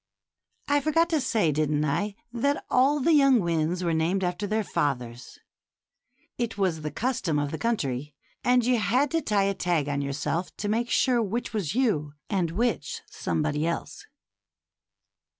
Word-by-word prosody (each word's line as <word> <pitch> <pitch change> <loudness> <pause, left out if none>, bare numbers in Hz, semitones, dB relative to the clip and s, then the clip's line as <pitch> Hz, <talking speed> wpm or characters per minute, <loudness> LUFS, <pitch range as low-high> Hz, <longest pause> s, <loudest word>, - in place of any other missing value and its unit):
I 285 0 +3
forgot 330 +3 +2
to 315 -3 +1
say, 215 -11 +1
didn't 150 0 +1
I, 200 +8 -1 0.2
that 280 +4 0
all 275 +4 +4
the 330 +5 +3
young 275 -4 +6
winds 170 0 0
were 170 -1 +1
named 170 +4 +1
after 180 +3 -2
their 215 +2 0
fathers? 125 -9 -3 1.0
It 230 -3 -2
was 180 -5 0
the 150 - -3
custom 220 - -1
of 145 -1 -1
the 160 - -4
country, 150 - -2 0.3
and 250 -1 +3
you 245 -1 +3
had 250 +8 +1
to 330 - +1
tie 210 -7 +1
a 195 0 +1
tag 175 -6 0
on 140 -1 -1
yourself 145 +5 -3
to 205 - -3
make 230 +3 0
sure 245 -1 +3
which 225 +2 -3
was 200 -5 -2
you 165 - +1 0.2
and 185 -5 +1
which 230 +9 -2
somebody 155 +1 -1
else. 170 - -4
195 Hz, 165 wpm, -26 LUFS, 155-240 Hz, 1.0 s, young